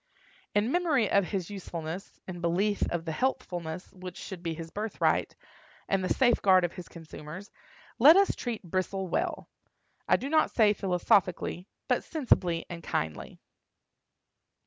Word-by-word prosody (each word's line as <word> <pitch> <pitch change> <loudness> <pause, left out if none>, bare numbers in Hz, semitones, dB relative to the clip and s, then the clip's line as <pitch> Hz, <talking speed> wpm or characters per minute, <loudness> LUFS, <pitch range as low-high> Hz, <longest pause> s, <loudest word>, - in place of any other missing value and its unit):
In 210 +4 +2
memory 310 - +2
of 200 -1 +4
his 190 0 -3
usefulness, 175 -2 -6
in 175 -2 -6
belief 195 +5 +1
of 175 -1 -2
the 160 - -2
healthfulness 175 -6 -3
which 185 -1 -9
should 190 -4 -7
be 165 -2 -3
his 165 0 -8
birthright, 215 +1 0 0.5
and 195 -1 +1
the 185 - -1
safeguard 200 -7 +4
of 175 - -4
his 180 -2 -9
consumers, 165 +3 -10 0.5
let 300 +9 +9
us 395 0 +4
treat 235 -4 -4
Bristle 185 +2 -2
well—I - - -3
do 265 - -5
not 310 +2 +3
say 215 -3 +4
philosophically, 180 -1 +1 0.2
but - - +1
sensibly 185 - +1
and 170 -1 -7
kindly. 80 - -4
185 Hz, 140 wpm, -29 LUFS, 170-215 Hz, 0.5 s, let